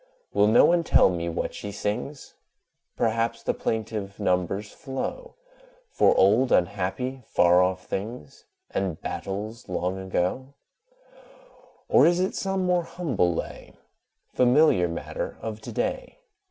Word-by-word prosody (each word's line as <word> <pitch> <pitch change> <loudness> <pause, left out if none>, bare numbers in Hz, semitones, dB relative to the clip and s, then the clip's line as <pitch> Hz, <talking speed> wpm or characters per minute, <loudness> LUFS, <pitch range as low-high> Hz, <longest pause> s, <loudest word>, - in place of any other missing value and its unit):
Will 105 - +4
no 110 +3 +6
one 170 0 +3
tell - - +5
me 85 -1 -3
what 85 - -3
she 105 - -6
sings? 105 +8 -4 0.6
Perhaps 115 0 0
the - - 0
plaintive 110 -3 -3
numbers 90 +3 -1
flow 160 - -6 0.6
For - - +3
old, 110 +7 +4
unhappy, 100 +8 0
far 90 +1 +4
off 90 0 0
things, 100 - -6 0.3
And 95 -5 -2
battles 105 +4 -5
long 90 +1 -2
ago: 95 +9 -2 1.3
Or - - +6
is 175 +1 +3
it 185 +1 0
some 195 -1 -1
more 180 -1 +2
humble 135 - 0
lay, - - -6 0.6
Familiar 125 - +4
matter 85 0 -5
of 110 -1 -6
to - - -8
day? - - -3
105 Hz, 125 wpm, -25 LUFS, 95-135 Hz, 1.3 s, no